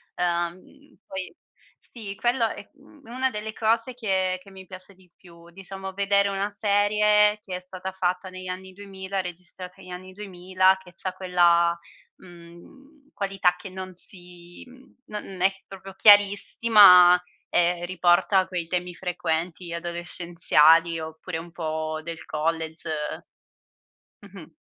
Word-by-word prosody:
Uhm, 175 0 -1 0.5
poi 190 -1 -6 0.6
sì, 210 -5 -8
quello 240 +2 +1
è, - - -9
mhmm, 295 - -20
una 255 +3 -1
delle 215 0 -6
cose 230 +3 0
che 190 -6 -1
che 195 - -16
mi 190 -1 -12
piace 185 +2 -7
di 185 -1 -24
più, 170 -2 -17
diciamo 190 +1 -8
vedere 200 +1 +2
una 195 +1 -2
serie 210 +1 +3
che 185 - -6
è - - -4
stata 185 +1 -7
fatta 185 0 -2
negli 185 0 -9
anni 185 +1 -7
2000, 195 0 -5
registrata 180 +1 -8
negli 185 -1 -14
anni 185 +1 -9
2000, 185 -1 +1
che 180 -1 -16
c'ha 185 - -3
quella, 170 -2 +3 0.4
mhmm, 185 - -17
qualità 195 -3 0
che 190 - -10
non 185 0 -8
si 175 -1 -14
mhmm 260 +1 -19
non 195 -3 -8
è 190 +1 +4 0.2
proprio 195 0 -11
chiarissima 205 -3 +7 0.3
e 175 0 +1
riporta 185 +1 +3
quei 180 -3 -4
temi 180 +1 -3
frequenti 170 0 -3
adolescenziali 170 -1 +2
oppure 160 +2 -6
un 165 +1 -9
po' 155 -1 -4
del 165 0 -7
college. 160 +1 -2 1.3
Mh-mh. 190 -5 -14
185 Hz, 135 wpm, -25 LUFS, 175-200 Hz, 1.3 s, chiarissima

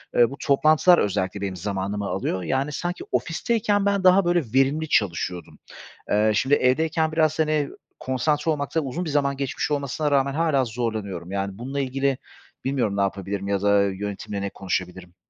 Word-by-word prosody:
Eee, 120 -1 +5
bu 140 - -8
toplantılar 155 +5 +5
özellikle 100 - -1
benim 95 -2 -3
zamanımı 100 +2 -3
alıyor, 95 -1 -2
yani, 135 - -1
sanki 175 +5 -4
ofisteyken 205 - 0
ben 200 -1 +1
daha, 185 +1 +6
böyle, 175 0 +3
verimli 140 +4 +2
çalışıyordum. 90 -5 -1 0.5
Eee, 105 +1 +3
şimdi 135 +5 +3
evdeyken 160 +5 +1
biraz, 155 -1 +1
hani, 155 -2 +1 0.3
konsantre 150 +4 0
olmakta 150 +2 -1
uzun 150 +6 -4
bir - - -3
zaman 140 -2 +1
geçmiş 140 +2 -2
olmasına 145 +1 -1
rağmen 140 -1 +2
hâlâ 150 -4 +2
zorlanıyorum. 110 -7 -4
Yani, 100 0 -3
bununla 135 +5 -4
ilgili 135 0 0 0.5
bilmiyorum 125 -7 0
ne - - +2
yapabilirim 100 0 -2
ya 100 -1 0
da 100 0 +4
yönetimle 100 +1 -4
ne 100 - -2
konuşabilirim. 90 -2 -4
130 Hz, 160 wpm, -24 LUFS, 100-155 Hz, 0.5 s, daha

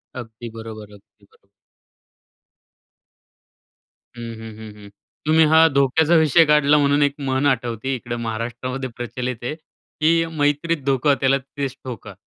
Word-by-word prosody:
अगदी 115 -1 -8
बरोबर 110 -2 -9
आहे. - - -13
अगदी 100 0 -30
बरोबर. 100 - -30 2.7
हं, 120 - -9 0.2
हं, 110 -1 -9
हं, 110 -1 -10
हं. 100 - -12 0.4
तुम्ही 160 +1 +5
हा 160 0 +7
धोक्याचा 145 +4 +2
विषय 160 +1 +5
काढला 150 0 +4
म्हणून 145 0 +2
एक 140 -1 +1
म्हण 135 0 -1
आठवते 125 -1 -1
इकडे 120 0 -5
महाराष्ट्रामध्ये 120 +3 -4
प्रचलित 125 +1 -4
आहे. 140 +5 -3
की 165 +1 -1
'मैत्रीत 150 0 -1
धोका 140 +1 +2
त्याला 135 0 +3
तिथेचं 135 0 -6
ठोका.' 110 -4 -8
135 Hz, 135 wpm, -21 LUFS, 115-145 Hz, 2.7 s, हा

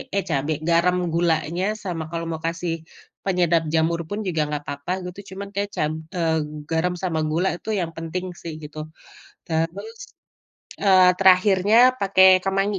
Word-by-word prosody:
eh 200 - +1
cabe, 145 +1 0 0.2
garam, 170 +2 +3 0.2
gulanya 165 +1 0 0.2
sama 170 -5 -3
kalo 165 0 -3
mau 160 -1 -5
kasih 170 0 -2 0.5
penyedap 175 -4 +2
jamur 165 +1 +2
pun 205 - -3
juga 165 -4 0
nggak 150 -1 -3
apa-apa 140 +4 -5
gitu, 180 +2 -8
cuman 200 +1 -7
kayak 200 0 -1
cab 150 +1 0 0.2
eee, 165 -2 +1 0.3
garam 165 +2 0
sama 165 -3 -1
gula 170 +4 +1
itu 220 - -9
yang 170 -2 -2
penting 165 +3 -4 0.2
sih 165 -2 -6
gitu. 150 +1 -10 0.7
Terus, 165 - -3 0.8
eee, 185 -2 +6
terakhirnya 190 +2 +4 0.2
pakai 190 -1 +5 0.2
kemangi. 195 +1 0
175 Hz, 150 wpm, -23 LUFS, 160-190 Hz, 0.8 s, eee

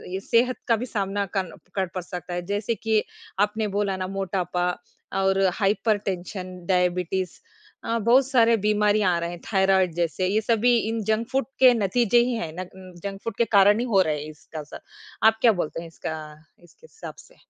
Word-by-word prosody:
अ, - - -2
सेहत 245 +2 +3
का 230 - +4
भी 230 +3 -4
सामना 200 -3 -2
कन 185 -4 -1 0.3
क 190 -1 +1
पड़ 180 - -3
सकता 180 0 -7
है। 175 - -2
जैसे 205 +3 -1
कि 220 +1 0 0.4
आपने 210 +1 +1
बोला 200 -2 0
ना 185 0 -3
मोटापा 180 -2 -2 0.5
और 195 0 +2
हाइपरटेंशन, 195 -3 -1
डायबिटीज़ 180 0 0 0.5
अ, 230 0 0
बहुत 245 +4 +4
सारे 235 -4 +4
बीमारियाँ 210 -3 +3
आ - - 0
रहे 170 0 -3
हैं, 175 - -8
थायराइड 190 -2 +3
जैसे, 175 +2 0
ये 210 +3 +1
सभी 235 +2 +3
इन 225 -1 -2
जंक 220 +1 0
फूड 270 +1 +1
के 255 -2 +8
नतीजे 230 +2 +2
ही - - -1
हैं। 165 -8 -4
नग 185 -1 -10
जंक 195 0 -5
फूड 230 -2 -4
के 235 - +3
कारण 205 +2 +6
ही 245 - -1
हो 195 - +6
रहे 155 -4 0
हैं 155 - -8
इसका 155 +1 -10
असर। 150 - -9 0.5
आप 220 0 +4
क्या 235 - +6
बोलते 160 +2 -4
हैं 170 - -9
इसका 160 -1 -6 0.5
इसके 175 - -20
हिसाब 445 - -9
से? - - -22
195 Hz, 190 wpm, -24 LUFS, 180-225 Hz, 0.5 s, के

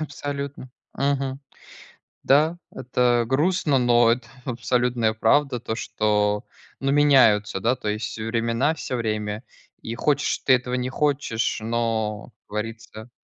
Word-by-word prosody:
Абсолютно, 140 -3 -5 0.3
мгм. 135 -1 -1 0.8
Да, 155 +5 +3
это 120 -1 +1
грустно, 150 +2 +2
но 120 -1 +4
это 120 0 -2 0.2
абсолютная 120 -2 0
правда. 125 +4 +2
То 110 -1 -4
что 105 -2 0 0.3
ну, 135 0 0
меняются, 130 -9 +4
да, 120 +5 +2
то 125 - -7
есть 105 +2 -3
времена 115 +5 0
всё 150 -4 -5
время. 105 -1 -3 0.4
И 115 - -5
хочешь 145 +4 0
ты 130 - +3
этого, 125 0 0
не 125 0 -2
хочешь, 135 -5 -1
но 110 -2 -1 0.2
как - - -55
говорится. 110 +1 -6
120 Hz, 125 wpm, -24 LUFS, 110-135 Hz, 0.8 s, но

